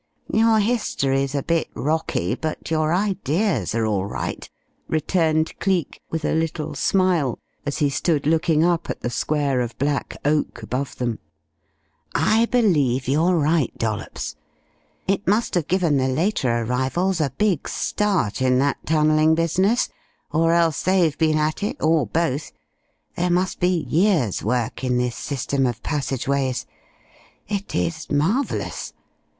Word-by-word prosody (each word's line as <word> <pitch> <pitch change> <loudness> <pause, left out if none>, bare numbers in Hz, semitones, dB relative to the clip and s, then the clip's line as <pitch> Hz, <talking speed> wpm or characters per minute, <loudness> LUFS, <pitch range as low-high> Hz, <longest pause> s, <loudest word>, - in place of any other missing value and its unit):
"Your 225 0 +4
history's 140 - 0
a 140 - -1
bit 165 -1 0
rocky, 150 - -1
but 160 0 -4
your 155 -1 +1
ideas 185 - 0
are 115 -1 +1
all 100 -3 0
right," - - -5 0.4
returned 160 0 +1
Cleek 185 -6 -1
with 160 -2 -3
a - - +1
little 160 -1 -2
smile, 180 - +1 0.3
as 145 - -1
he 145 -2 +2
stood 150 +1 0
looking 160 0 +3
up 175 -1 0
at - - -4
the 120 - -2
square 140 -2 0
of 120 -1 -4
black 140 +1 -1
oak 150 +1 0
above 130 +2 -3
them. 120 -3 -2 1.0
"I 220 +10 +3
believe 145 - +2
you're 165 +6 +3
right, 155 -3 +1
Dollops. 110 -1 -3 0.7
It 195 +2 0
must 210 +5 +2
have 175 -5 0
given 175 -6 +2
the 130 -1 +1
later 155 - 0
arrivals 135 +10 0
a 145 - +1
big 205 -8 +1
start 190 - 0
in 130 -1 +3
that 140 +1 0
tunnelling 155 0 +4
business, 185 +8 +2 0.4
or 165 +1 +3
else 165 -3 +2
they've 180 -5 +2
been 155 -1 +2
at 155 +3 0
it, 205 - -2
or 155 -5 +2
both. 145 +1 -1 0.6
There 180 +1 0
must 180 +2 0
be 180 -2 +1
years' 165 - +2
work 120 +3 -1
in 125 -1 +1
this 125 -1 -1
system 135 -1 -1
of 120 -2 -4
passageways. 135 -2 -1 0.8
It 200 -1 -4
is 165 -1 -2
marvellous. 185 - -1
155 Hz, 145 wpm, -22 LUFS, 135-180 Hz, 1.0 s, Your